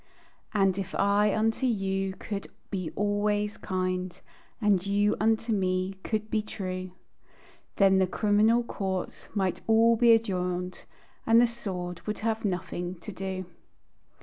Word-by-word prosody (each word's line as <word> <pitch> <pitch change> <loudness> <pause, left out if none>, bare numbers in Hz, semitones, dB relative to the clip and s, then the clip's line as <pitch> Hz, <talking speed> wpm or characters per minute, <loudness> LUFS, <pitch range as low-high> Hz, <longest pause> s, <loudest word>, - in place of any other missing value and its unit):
And 195 -2 +2
if 190 - -5
I 205 +1 +3
unto 225 +4 +1
you 195 -3 -1
could 200 -2 -5 0.2
be 185 -5 -2
always 205 0 0
kind, 185 -1 -2 0.4
And 205 -5 +3
you 205 +1 +2
unto 225 +1 +2
me 185 -1 0
could 215 -1 -2
be 215 - +2
true, 185 -3 -5 0.9
Then 195 -1 +5
the 190 - +3
criminal 215 +4 +3
courts 190 -5 -4
might 190 -3 0
all 225 +1 +5
be 235 +1 +5
adjourned, 180 -4 -1 0.4
And 225 +1 +7
the 240 - +6
sword 185 -7 -5
would 210 - -2
have 225 -1 0
nothing 180 -2 -3
to 190 +4 -9
do. 190 -1 -4
200 Hz, 135 wpm, -28 LUFS, 185-215 Hz, 0.9 s, And